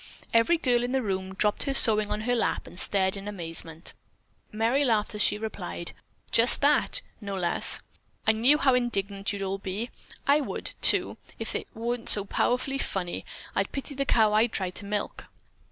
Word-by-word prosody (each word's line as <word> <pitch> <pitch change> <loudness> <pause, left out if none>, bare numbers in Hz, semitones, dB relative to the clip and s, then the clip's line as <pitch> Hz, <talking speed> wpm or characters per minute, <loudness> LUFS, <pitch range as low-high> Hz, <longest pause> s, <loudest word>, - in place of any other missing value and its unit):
_" - - -13 0.3
Every 230 +10 +4
girl 245 -6 +1
in 245 +1 -3
the 265 -1 0
room 190 -2 -3
dropped 210 +1 0
her 275 -1 -1
sewing 215 -4 +6
on 210 - -2
her 245 +3 0
lap 235 - -1
and 175 - -11
stared 190 -2 +1
her 200 +1 -5
amazement. 165 -3 -4 0.6
Merry 230 +6 +1
laughed 220 -6 +1
as 210 - -1
she 210 - +4
replied: 200 -5 -6 0.4
"Just 230 +2 +5
that, 290 +1 +2 0.2
no 200 -1 -5
less. 175 -2 +1 0.4
I - - +5
knew 240 +7 +3
how 275 -3 +3
indignant 200 -5 -1
you'd 200 -1 -4
all 195 0 -3
be. 200 +5 -5 0.3
I 290 +2 +4
would, - - -4
too, - - +3 0.2
if - - -4
it - - -4
weren't 235 +1 -2
so 205 -1 +8
powerfully 255 +6 0
funny. 180 -7 -4 0.3
I'd - - -1
pity 275 +1 -5
the 275 0 -2
cow 220 -5 +3
I'd 220 +2 +3
try 185 -2 -2
to 200 - -9
milk." 205 0 -4
215 Hz, 185 wpm, -27 LUFS, 195-245 Hz, 0.6 s, so